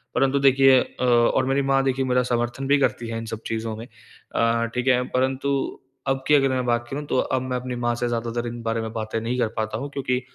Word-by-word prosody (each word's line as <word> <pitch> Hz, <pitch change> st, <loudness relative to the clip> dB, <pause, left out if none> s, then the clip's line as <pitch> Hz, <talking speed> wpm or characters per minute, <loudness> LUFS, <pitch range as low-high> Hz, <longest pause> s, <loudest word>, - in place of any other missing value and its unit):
परंतु 135 Hz, +1 st, +2 dB
देखिए 135 Hz, -1 st, +6 dB
अ, -, -, -6 dB
और 120 Hz, +1 st, +3 dB
मेरी 135 Hz, +1 st, +1 dB
माँ 135 Hz, 0 st, +2 dB
देखिए 135 Hz, 0 st, 0 dB
मेरा 125 Hz, 0 st, +2 dB
समर्थन 120 Hz, +2 st, -2 dB
भी 145 Hz, -, +4 dB
करती 120 Hz, -3 st, 0 dB
हैं 115 Hz, -, -3 dB
इन 115 Hz, -, -5 dB
सब 110 Hz, 0 st, -6 dB
चीज़ों 110 Hz, 0 st, -3 dB
में। 115 Hz, -, -7 dB, 0.5 s
अ, 115 Hz, 0 st, +2 dB
ठीक 125 Hz, +1 st, -2 dB
है। 125 Hz, -1 st, +4 dB
परंतु 130 Hz, +2 st, 0 dB, 0.6 s
अब 135 Hz, 0 st, 0 dB
की -, -, +4 dB
अगर 135 Hz, -2 st, +4 dB
मैं 130 Hz, -1 st, -1 dB
बात 120 Hz, 0 st, 0 dB
करूँ 145 Hz, +2 st, -4 dB
तो -, -, 0 dB
अब 130 Hz, -, 0 dB
मैं 130 Hz, 0 st, -2 dB
अपनी 125 Hz, 0 st, -5 dB
माँ 120 Hz, -, +2 dB
से 120 Hz, +1 st, -1 dB
ज़्यादातर 120 Hz, 0 st, -2 dB
इन 120 Hz, 0 st, -6 dB
बारे 115 Hz, 0 st, -1 dB
में 110 Hz, -, -5 dB
बातें 110 Hz, 0 st, -3 dB
नहीं 120 Hz, +3 st, -2 dB
कर 120 Hz, -, +2 dB
पाता 110 Hz, 0 st, -2 dB
हूँ 140 Hz, +5 st, -5 dB
क्योंकि 125 Hz, -2 st, -1 dB
125 Hz, 245 wpm, -24 LUFS, 115-135 Hz, 0.6 s, देखिए